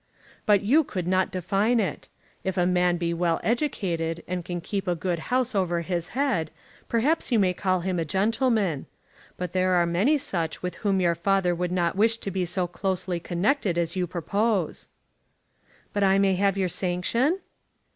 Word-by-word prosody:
"But 205 -2 +4
you 285 +10 +4
could 185 - -4
not 185 0 +2
define 195 +6 +1
it. 200 - -3 0.3
If 190 0 -2
a 175 - +3
man 180 -1 +2
be 170 -1 -1
well 170 -1 +1
educated, 175 - -1
and 180 -1 -3
can 175 0 -4
keep 195 +3 -4
a 175 - +1
good 175 0 -2
house 255 -1 +1
over 175 -4 0
his 170 0 -2
head, 250 - +1 0.4
perhaps 270 +7 +1
you 235 - +4
may 190 -3 +3
call 185 -1 0
him 180 0 -1
a - - +1
gentleman. 200 - +1 0.5
But 180 -1 -4
there 185 0 +2
are 175 -1 +4
many 195 - +2
such 165 - -3
with 180 -1 -2
whom 195 -3 +1
your 170 -1 +3
father 180 +1 +1
would 175 +1 -2
not 175 -1 0
wish 225 +3 +3
to 200 - -5
be 185 -1 -1
so 180 +1 -1
closely 180 0 -2
connected 180 - 0
as 170 0 -1
you 180 -1 0
propose." 190 +2 -1 1.1
"But 205 - 0
I 195 0 +4
may 195 -1 +3
have 195 +1 +1
your 190 -1 +1
sanction?" 185 - 0
185 Hz, 180 wpm, -26 LUFS, 175-205 Hz, 1.1 s, But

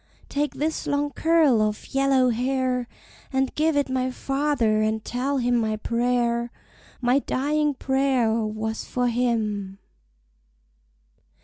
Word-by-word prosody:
Take 290 +1 -1
this 310 +2 -2
long 290 0 0
curl 320 -9 +3
of 215 +3 -2
yellow 270 -2 +3
hair, 250 +1 0 0.4
And 265 -1 0
give 310 0 +1
it 285 - +2
my 260 -1 -1
father, 270 -5 0
and 215 0 -1
tell 270 +3 -1
him 245 -1 +1
my 220 -2 +1
prayer, 235 +1 0 0.5
My 250 +2 +3
dying 295 +2 0
prayer, 265 -4 +1
was 220 0 -2
for 245 -1 -1
him." 215 -5 -1
250 Hz, 120 wpm, -24 LUFS, 230-275 Hz, 0.5 s, curl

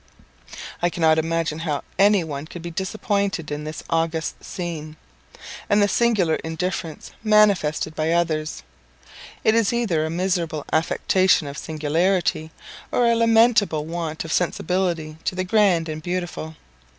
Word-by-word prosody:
I 175 - +3
cannot 160 -2 +3
imagine 165 -1 -1
how 155 -4 -2 0.2
any 200 -2 +5
one 145 -1 -6
could 170 0 -9
be 170 - -5
disappointed 195 -2 -2
in 150 +1 -4
this 155 +1 -6
august 165 0 -1
scene; 155 -4 -6 0.7
and 205 - +4
the 205 - +4
singular 205 -8 +2
indifference 165 -1 -4
manifested 205 -9 +3
by 155 +1 -1
others; 155 - -1 0.8
it 220 - +4
is 225 -3 +3
either 215 -10 0
a 160 - -2
miserable 170 -3 -1
affectation 180 +2 +2
of 140 0 -6
singularity, 160 +2 0 0.4
or 245 - +2
a 235 0 +4
lamentable 225 -8 +3
want 165 -1 -4
of 160 - -3
sensibility 175 -3 -1
to - - -2
the 185 - -1
grand 185 -4 +3
and 155 0 -5
beautiful. 175 -2 -4
170 Hz, 140 wpm, -23 LUFS, 155-190 Hz, 0.8 s, any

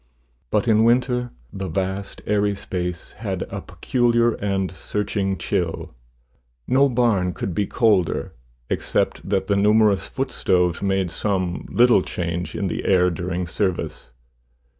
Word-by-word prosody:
But 105 - +1
in 110 -1 +4
winter 125 +1 +2 0.2
the 95 -1 -4
vast 95 +1 -3
airy 105 -1 +1
space 90 -3 -4
had - - -3
a - - -4
peculiar 120 -2 +1
and 95 -3 -1
searching 95 +1 -2
chill. - - -2 0.7
No 135 +2 +4
barn 115 -8 +2
could 95 - -3
be 100 +2 0
colder, 100 -9 +1 0.3
except - - -1
that 95 -1 +1
the 100 - +1
numerous 105 -3 +3
footstoves 90 -9 0
made 95 -3 0
some 95 -1 -1
little 120 -4 +5
change 85 -1 -4
in 100 - -2
the 90 - -2
air 90 -1 +4
during 90 +1 -3
service. 90 - -2
100 Hz, 130 wpm, -22 LUFS, 90-110 Hz, 0.7 s, little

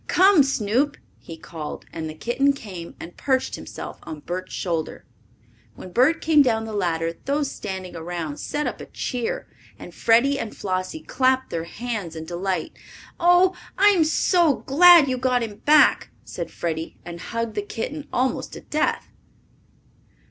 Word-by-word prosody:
"Come, 375 -2 +6
Snoop!" 270 +2 +1 0.2
he 165 - -10
called, 160 -1 -8
and 160 -1 -4
the 155 - -8
kitten 255 - +1
came 190 -10 -9
and 170 - -9
perched 260 -1 0
himself - - -7
on 155 -3 -8
Bert's 185 +4 -5
shoulder. 165 -4 -3 0.7
When 185 - -10
Bert 260 - +3
came 310 -2 +5
down 225 -4 +2
the 220 - -6
ladder 165 -4 -1
those 285 0 0
standing 190 -3 -6
around 165 -3 -5
set 295 0 -2
up - - -4
a - - -9
cheer, 245 -3 -3 0.3
and - - -11
Freddie 255 +5 +3
and 220 - -6
Flossie 185 +11 -3
clapped 260 0 +1
their 165 -1 -3
hands 210 -4 -5
in 160 0 -6
delight. 180 0 -2 0.5
"Oh, 355 +2 +5 0.2
I'm 400 -4 +5
so 320 -1 +2
glad 335 +2 +8
you 255 -1 -1
got 250 -1 +1
him 210 -3 -6
back!" 300 +1 +5
said 170 -2 -6
Freddie 160 -1 -4
and 170 0 -7
hugged 230 +3 -3
the 210 - -1
kitten 275 +8 -5
almost 255 +1 -1
to - - -8
death. 305 - -1
230 Hz, 155 wpm, -23 LUFS, 175-280 Hz, 0.7 s, glad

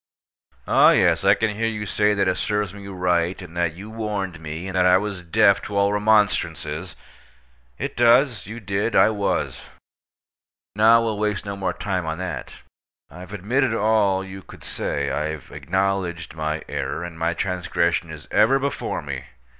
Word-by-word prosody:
Oh, - - +6
yes, 85 -3 +3
I 100 +1 +6
can 110 -1 -1
hear 115 +2 0
you 105 -2 -3
say 105 +1 +2
that 100 - +1
it 90 - +1
serves 105 -3 -1
me 100 -1 -10
right, 90 -2 0
and 90 -3 -11
that 85 -2 0
you 100 +4 -9
warned 105 -6 -3
me, 80 +2 -6
and 95 - -5
that 90 0 +4
I 90 0 +6
was 100 -2 -4
deaf 100 +3 +3
to 100 - -4
all 100 0 +3
remonstrances. 105 -6 +1 0.8
It - - -4
does. 120 0 +4
You 115 +3 -7
did. 100 +2 -2
I - - +6
was. 100 -2 -2 1.1
Now, 115 +2 +6
we'll 110 -2 -2
waste 105 -1 -1
no 100 0 -4
more 95 -2 -2
time 95 -4 -3
on 80 0 -2
that. 90 -9 -5 0.6
I've 90 +4 -11
admitted 115 +5 0
all 105 -3 +2
you 95 0 -9
could - - -14
say. - - -2
I've 75 0 -4
acknowledged 95 -2 -2
my 80 -1 -3
error, 70 +2 -3
and 85 -2 -8
my 85 +1 0
transgression 85 -2 -1
is 75 -2 -10
ever 110 +6 +4
before 140 +1 -3
me. 70 -2 -5
95 Hz, 170 wpm, -23 LUFS, 85-105 Hz, 1.1 s, Oh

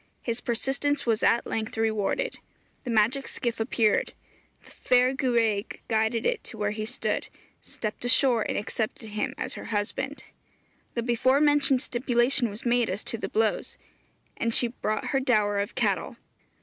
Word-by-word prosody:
His 235 0 -3
persistence 275 +4 -1
was 225 -2 +1
at 235 - +3
length 220 0 -3
rewarded. 225 - 0 0.5
The - - -4
magic 230 +5 +2
skiff 235 -3 -3
appeared; 225 -1 +1 0.5
the - - -16
fair 250 +1 +3
gwraig 230 -6 0
guided 220 +1 +1
it 480 -3 0
to 225 - -9
where 210 -1 0
he 215 0 -4
stood; 250 - -2 0.3
stepped 215 0 -6
ashore, 245 -1 +4
and - - -1
accepted 220 +1 -3
him 235 +6 -2
as 255 - -3
her - - -8
husband. 230 +6 -3 0.7
The 235 - 0
before 255 +3 +3
mentioned 290 -3 +3
stipulation 240 -1 +1
was 205 +4 -9
made 240 -1 +2
as 190 +3 -3
to 230 - -2
the - - -4
blows; 220 0 0 0.6
and 230 0 +1
she 240 - +4
brought 215 -2 -2
her 270 - +3
dower 210 -6 +2
of 200 - -3
cattle. - - 0
235 Hz, 160 wpm, -27 LUFS, 220-260 Hz, 0.7 s, ashore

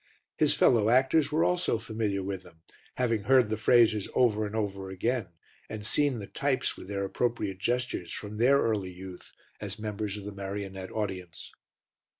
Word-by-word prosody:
His - - +3
fellow 110 -3 +4
actors 135 +5 +3
were 155 +2 +2
also 180 -9 +1
familiar 110 -3 -2
with 95 -1 -4
them, 85 -3 -19 0.3
having 115 -5 0
heard 130 -4 +4
the - - +2
phrases 110 -2 +4
over 110 -4 +3
and 105 - -7
over 100 -3 -3
again, 110 +3 -1 0.4
and 105 -1 -6
seen 145 +2 +2
the 105 - -6
types 140 +4 -1
with - - -11
their 100 0 -2
appropriate 105 -3 -2
gestures 120 -6 -1
from 105 0 -6
their 130 +5 +5
early 105 -7 0
youth 90 0 -10 0.3
as 100 0 -6
members 105 -1 -4
of 105 - -8
the 105 - -6
marionette 95 -1 -6
audience. 95 -6 -5
105 Hz, 165 wpm, -29 LUFS, 95-120 Hz, 0.4 s, their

